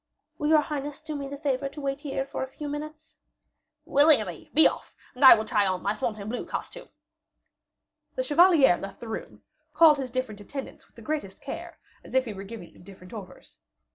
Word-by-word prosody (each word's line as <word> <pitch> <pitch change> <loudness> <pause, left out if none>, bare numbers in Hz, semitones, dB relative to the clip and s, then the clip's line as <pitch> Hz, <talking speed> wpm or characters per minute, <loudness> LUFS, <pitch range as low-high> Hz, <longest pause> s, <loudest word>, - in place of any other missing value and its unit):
"Will 295 - -1
your 310 -1 +6
highness 290 -1 -5
do 305 - -7
me 280 -1 -5
the 280 +1 -7
favor 275 -2 -1
to 285 +2 -11
wait 275 0 -3
here 270 -2 -3
a 265 - -3
few 295 +3 -8
minutes?" 305 +2 -8 0.7
"Willingly; 280 - +3
be 315 - +6
off, - - -6 0.2
and 255 +2 -4
I 260 - +11
will 220 -1 -3
try 210 -3 +2
on 185 -1 -2
my 200 - 0
Fontainebleau 215 +2 -4
costume." - - -7 1.3
The - - -1
chevalier 320 - +5
left 195 0 -8
the 235 - -9
room, 220 - -7 0.3
called 310 -3 +6
his 260 -2 -4
different 235 -5 -4
attendant 270 +6 -8
with - - -35
the - - -13
greatest 295 -11 -4
care, - - -7 0.3
as - - -10
if 260 0 +3
he 220 - -5
were 195 0 -8
giving 200 -3 -10
them - - -18
different 185 +1 -14
orders. 195 -5 -11
270 Hz, 195 wpm, -26 LUFS, 215-295 Hz, 1.3 s, I